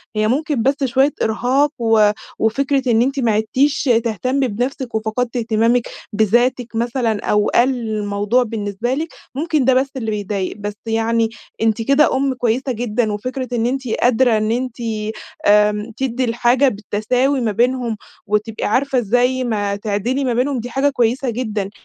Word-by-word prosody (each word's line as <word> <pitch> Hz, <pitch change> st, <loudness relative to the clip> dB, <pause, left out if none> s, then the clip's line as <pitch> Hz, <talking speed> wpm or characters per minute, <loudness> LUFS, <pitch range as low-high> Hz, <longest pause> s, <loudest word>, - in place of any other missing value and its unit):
هي 215 Hz, 0 st, +1 dB
ممكن 285 Hz, +1 st, 0 dB
بس 275 Hz, +2 st, +1 dB
شوية 265 Hz, +3 st, +2 dB
إرهاق، 255 Hz, +6 st, +1 dB
و 225 Hz, -3 st, +4 dB, 0.3 s
وفكرة 265 Hz, +3 st, +1 dB
إن 225 Hz, 0 st, +4 dB
أنتِ 270 Hz, +3 st, 0 dB
ما 235 Hz, -4 st, +2 dB
عِدتيش 255 Hz, +8 st, +1 dB, 0.2 s
تهتمي 255 Hz, +5 st, 0 dB
بنفسك 245 Hz, +2 st, -3 dB
وفقدتي 230 Hz, +3 st, -1 dB
اهتمامك 230 Hz, +1 st, +1 dB, 0.3 s
بذاتك 235 Hz, +3 st, +1 dB
مثلًا، 230 Hz, -2 st, -1 dB
أو 210 Hz, 0 st, +2 dB
قلّ 245 Hz, +2 st, +5 dB, 0.2 s
الموضوع 210 Hz, +3 st, 0 dB
بالنسبة 220 Hz, +1 st, -3 dB
لك، 315 Hz, +4 st, -2 dB, 0.3 s
ممكن 305 Hz, -2 st, 0 dB
ده 265 Hz, -, +5 dB
بس 260 Hz, +2 st, +2 dB
اللي 225 Hz, -4 st, -3 dB
بيضايق، 205 Hz, -2 st, -3 dB
بس 205 Hz, 0 st, -4 dB
يعني 225 Hz, 0 st, +1 dB, 0.3 s
أنتِ 225 Hz, 0 st, +1 dB
كده 275 Hz, +3 st, +3 dB
أم 270 Hz, 0 st, +1 dB
كويسة 250 Hz, +2 st, -1 dB
جدًا، 230 Hz, -1 st, -1 dB
وفكرة 255 Hz, +5 st, -4 dB
إن 235 Hz, -1 st, 0 dB
أنتِ 260 Hz, 0 st, -2 dB
قادرة 240 Hz, 0 st, +2 dB
إن 215 Hz, +1 st, 0 dB
أنتِ 250 Hz, 0 st, -2 dB, 0.7 s
آآ، 210 Hz, +2 st, +3 dB
تدِّي 260 Hz, -1 st, -1 dB
الحاجة 240 Hz, +3 st, +3 dB
بالتساوي 245 Hz, +6 st, 0 dB
ما 220 Hz, -3 st, 0 dB
بينهم، 240 Hz, 0 st, 0 dB, 0.3 s
وتبقي 210 Hz, +1 st, -1 dB
عارفة 265 Hz, +4 st, +1 dB
إزاي 245 Hz, +3 st, +1 dB
ما 205 Hz, -4 st, -1 dB
تعدلي 220 Hz, +6 st, -1 dB
ما 245 Hz, -2 st, 0 dB
بينهم، 255 Hz, +1 st, 0 dB
دي 245 Hz, +2 st, -7 dB
حاجة 270 Hz, +4 st, +2 dB
كويسة 250 Hz, -1 st, 0 dB
جدًا، 215 Hz, -4 st, -3 dB
235 Hz, 155 wpm, -19 LUFS, 215-260 Hz, 0.7 s, قلّ